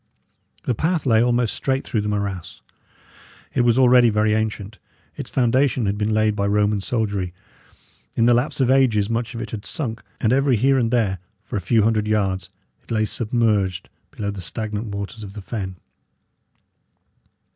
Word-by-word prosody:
The 125 - 0
path 160 +7 0
lay 115 -3 +4
almost 120 -1 +2
straight 135 0 -1
through 110 - -1
the 105 - -2
morass. 100 -4 -4 0.9
It - - +2
was 120 0 +3
already 125 -2 +6
very 105 0 +2
ancient; 110 -1 -3 0.4
its - - -6
foundation 130 -1 +2
had 100 +1 0
been 105 +1 -1
laid 110 -1 +2
by 100 -1 0
Roman 105 0 +2
soldiery; 100 -5 -2 0.8
in 115 - +4
the 120 - +5
lapse 125 +5 0
of 130 -1 +3
ages 115 -6 +3
much 115 0 -2
of 115 - -4
it 110 - -8
had 105 -2 -5
sunk, 115 -6 -4 0.2
and 115 +1 +2
every 135 -1 +3
here 135 +4 +3
and 115 -2 +1
there, 110 -6 +1 0.2
for - - -7
a 100 - -1
few 115 0 +2
hundred 110 -1 +1
yards, 95 -4 0 0.3
it - - -28
lay 110 -1 +1
submerged 105 -5 0 0.2
below 100 -1 -4
the 100 -2 -7
stagnant 105 +4 -4
waters 100 +2 -6
of 100 -1 -9
the 105 - -7
fen. 95 -2 -5
110 Hz, 175 wpm, -22 LUFS, 105-120 Hz, 0.9 s, already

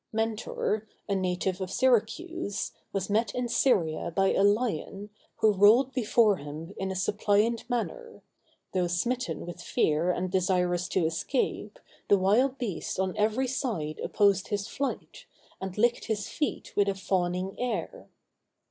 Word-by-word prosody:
Mentor, 220 -1 -2 0.2
a 200 - 0
native 185 0 -1
of 185 - -3
Syracuse, 255 - 0 0.2
was 195 -1 -2
met 220 +3 0
in 250 -1 -1
Syria 170 - +1
by 195 +3 +2
a - - +2
lion, 205 -1 0 0.2
who 220 -2 +3
rolled 225 +7 +5
before 225 -4 +3
him 155 +5 -8
in 190 - -2
a 190 - -3
suppliant 210 +4 +1
manner; 460 - -4 0.5
though 180 -1 +1
smitten 235 +9 -2
with 175 0 -8
fear 160 0 +1
and 180 0 -1
desirous 180 -2 +1
to 180 - +1
escape, 165 - -2 0.3
the 200 - +5
wild 235 +8 +3
beast 215 -7 -4
on 190 -1 0
every 220 +5 +1
side 215 - -3
opposed 200 -2 +2
his 205 -2 -2
flight, 280 0 -5 0.3
and 190 0 -5
licked 240 +2 +2
his 210 -2 -2
feet 300 - -3
with 200 -1 +3
a 195 - -1
fawning 185 0 -1
air. 225 -9 -3
200 Hz, 145 wpm, -28 LUFS, 185-235 Hz, 0.5 s, rolled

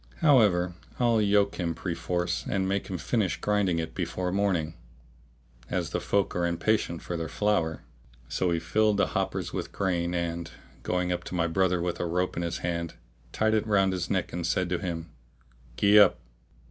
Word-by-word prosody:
However, 105 - +4 0.3
I'll 120 -3 +3
yoke 100 -1 +2
him 85 -2 -1
perforce 90 +1 -2
and 95 -1 0
make 100 +1 -1
him 95 - -3
finish 105 +1 0
grinding 105 -4 +1
it 80 -1 -3
before 90 +1 -2
morning, 90 -5 0 1.0
as - - -2
the - - -1
folk 100 -2 0
are 90 - 0
impatient 85 0 0
for 90 - -4
their 80 -1 -3
flour." 85 -7 0 0.4
So 90 - 0
he 85 - +1
filled 105 +4 +2
the - - +2
hoppers - - -2
with - - -4
grain 90 -3 -1
and, 85 -1 -2 0.3
going 90 0 -1
up 90 - -2
to - - -5
my 85 -2 +2
brother 90 +2 +1
with 90 -1 -2
a 90 - -1
rope 90 +2 -1
in 85 - -2
his 85 0 -2
hand, 85 -1 -2 0.4
tied 110 0 +1
it 110 0 +1
round 95 -2 +3
his 90 -3 -3
neck - - -1
and 85 0 -3
said 90 +1 0
to 90 -1 0
him, 85 -3 -5 0.7
"Gee 105 +1 +6
up! 100 -3 +6
90 Hz, 185 wpm, -28 LUFS, 85-100 Hz, 1.0 s, Gee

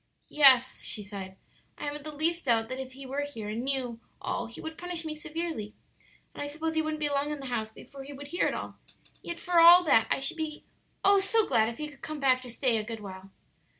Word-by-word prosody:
"Yes," 260 -3 +6
she 210 - -5
sighed; 195 -2 -7 0.4
"I - - -8
haven't 290 0 -4
the 305 - -4
least 330 +3 -1
doubt 225 -3 +2
that 255 +1 -4
if 260 -1 -8
he 270 +1 -10
were 275 +2 -2
here 235 -8 -5
and 220 +2 -3
knew 255 -4 -2 0.2
all 240 - -3
he 230 - -11
would 320 0 -6
punish 350 -1 -4
me 310 - -3
severely 320 -4 -4
again; - - -33
and - - -7
I 290 - -2
suppose 315 +2 -3
he 315 - +2
wouldn't 310 0 -3
be 300 - 0
long 285 0 0
in 300 -1 -4
the 275 - -8
house 220 -2 -1
before 275 +5 -12
he 280 - -10
would 285 +1 -9
hear 350 - +1
it - - -1
all; - - -7 0.4
yet 340 0 -6
for 355 -1 +2
all 345 +2 +9
that 225 -9 +4
I - - +1
should 275 +5 -1
be 310 -1 -4 0.4
oh, 400 0 +6
so 415 +3 +3
glad 220 0 +3
if 235 - -8
he 300 - -4
could 290 -2 -15
come 310 -1 -5
back 260 -2 +3
to 250 - -9
stay 240 -1 +1
a 215 - -1
good 225 0 -6
while." 190 -1 -9
285 Hz, 250 wpm, -29 LUFS, 235-315 Hz, 0.4 s, all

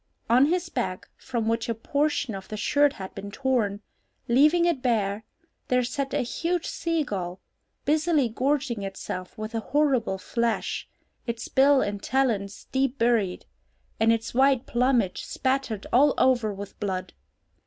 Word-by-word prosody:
On 255 +4 +6
his 350 +2 0
back, 185 - -3
from 235 -4 -3
which 230 0 0
a 230 - 0
portion 285 +1 0
of 195 -1 -7
the 215 - -6
shirt 285 +6 +3
had 190 -6 -8
been 200 - -7
torn, 215 -4 0 0.5
leaving 300 +8 +5
it 335 -7 +1
bare, 215 -4 0 0.4
there 250 0 +2
sat 275 +3 -3
a - - +2
huge 335 +7 -2
sea 330 -2 -1
gull, 185 -7 -4 0.5
busily 305 -2 +2
gorging 255 0 -1
itself 195 0 -6
with 215 0 -5
the 230 - -2
horrible 260 -6 +1
flesh, 230 +3 -2 0.4
its 235 -1 -3
bill 275 0 +5
and 205 -1 -3
talons 220 -7 -1
deep 270 0 0
buried, 230 -7 +1 0.5
and 225 +1 +4
its 225 -1 -1
white 265 0 +3
plumage 240 -6 +1
spattered 260 -6 -1
all 280 +4 +5
over 240 -5 +3
with 200 0 -8
blood. 190 -3 -3
240 Hz, 150 wpm, -26 LUFS, 210-275 Hz, 0.5 s, On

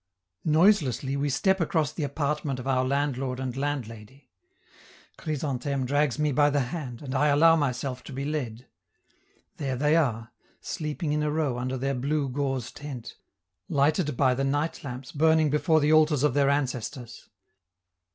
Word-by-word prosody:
Noiselessly 155 - +3
we 140 +1 0
step 190 +7 +1
across 155 -2 +1
the - - -5
apartment 145 -1 -2
of 125 - -7
our 130 -1 +1
landlord 135 -1 -1
and 130 -2 -4
landlady. 135 -3 -5 0.9
Chrysantheme 140 -3 -2
drags 145 0 +1
me 150 -1 +1
by 145 +2 +4
the 145 0 +1
hand, 135 -7 -6
and 130 -2 -5
I 145 +2 +2
allow 160 +3 +6
myself 130 -3 -2
to - - -9
be 135 +1 -4
led. 125 -6 -4 0.9
There 135 -3 -2
they 150 +4 +2
are, 115 -8 0 0.3
sleeping 155 -2 -3
in 150 - 0
a 150 - 0
row 150 -5 -1
under 130 +1 -2
their 135 +2 -1
blue 140 +2 -1
gauze 135 -2 -2
tent, 135 -5 -8 0.5
lighted 150 0 +1
by 130 -2 +4
the 135 +2 -1
night 145 +4 -1
lamps 130 -1 -7
burning 160 0 +3
before 155 +2 +3
the 150 +1 +3
altars 155 -3 +4
of 150 - +3
their 140 0 +3
ancestors. 125 -3 -3
140 Hz, 160 wpm, -27 LUFS, 130-150 Hz, 0.9 s, allow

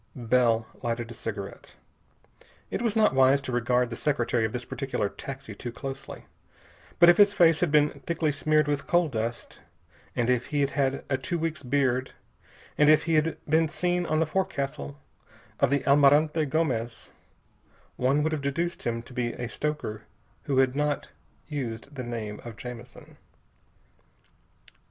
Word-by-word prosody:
Bell 120 -2 +2 0.2
lighted 120 -1 -3
a - - -6
cigarette. 105 -4 -7 1.0
It - - -2
was 230 -3 0
not 215 -7 +4
wise 135 +1 +5
to 130 - -4
regard 125 0 +1
the - - -3
secretary 120 -3 0
of 110 - -2
this 125 0 -5
particular 130 -7 -2
taxi 135 +4 -8
too 120 - -6
closely, 135 +2 -7 0.7
but 170 - +7
if 175 - +7
his 205 -1 +6
face 165 -2 +5
had 175 - +2
been 150 -1 +3
thickly 165 -2 +1
smeared 155 +1 +2
with 145 -1 -2
coal 175 -2 +3
dust, 115 -1 -4 0.5
and 120 - +1
if 125 -1 +1
he 145 -1 0
had 140 0 +1
had 135 -1 -1
a 130 -1 0
two 175 +6 -2
weeks' 160 -3 -2
beard, 130 -1 0 0.7
and 150 0 +6
if 155 - +6
he 165 0 -1
had 155 +1 +2
been 160 +1 +3
seen 175 +2 -1
on 155 - +1
the 160 - +3
forecastle 140 - -3 0.6
of - - +3
the 140 +1 0
Almirante 145 +3 +4
Gomez, 130 -6 -2 0.8
one 135 +4 +2
would 160 - 0
have 155 -2 -2
deduced 170 +5 -2
him 115 0 -2
to 125 - -13
be 120 -1 -2
a 120 - -5
stoker 145 -7 -3 0.4
who 140 -2 0
had 130 0 +3
not 145 0 -1 0.4
used 135 -3 -5
the 130 -3 -5
name 115 -3 -5
of 115 -3 -9
Jamison. 120 +3 -10
140 Hz, 165 wpm, -27 LUFS, 120-155 Hz, 1.0 s, but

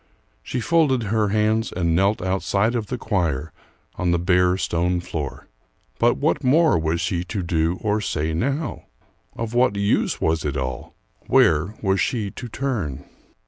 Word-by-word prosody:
She 125 - -4
folded 145 -5 +2
her 105 0 +1
hands 110 +2 +1
and 85 -2 0
knelt 100 +2 +2
outside 95 +4 0
of 115 -4 -2
the 125 - -3
choir 80 - -1 0.5
on 90 - +1
the 85 - +3
bare 90 +1 +2
stone 90 0 0
floor. 80 -5 -5 0.5
But - - +3
what - - 0
more 155 - +4
was 80 +1 -1
she 85 0 -1
to 95 0 -3
do 85 0 0
or 105 0 0
say 80 -5 -2
now? 140 - -2 0.5
Of 115 0 -4
what 120 -3 +3
use 100 +1 +1
was 80 0 0
it 70 -1 -2
all? 65 -2 -5 0.3
Where 85 +6 +3
was 95 -1 +2
she 105 -5 -1
to 125 - -8
turn? 100 - -3
95 Hz, 160 wpm, -22 LUFS, 85-110 Hz, 0.5 s, more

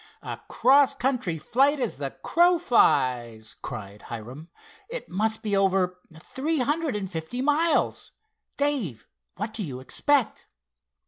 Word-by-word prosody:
"A - - -6
cross 275 +2 +4
country 250 -11 -1
flight 270 - +2
as 240 - -2
the 140 -1 -2
crow 350 - +3
flies!" 120 - +1
cried 105 -3 -7
Hiram. 125 +8 -8 0.4
"It - - -6
must 220 +4 -1
be 210 -2 0
over 190 -2 +1 0.2
three 300 - -2
hundred 295 0 0
and 200 -2 -2
fifty 165 +7 -5
miles. 310 +3 +1 0.5
Dave, 245 - -1 0.3
what 210 +4 -4
do 225 - -4
you 135 -9 -5
expect?" 265 - 0
215 Hz, 130 wpm, -26 LUFS, -, 0.5 s, cross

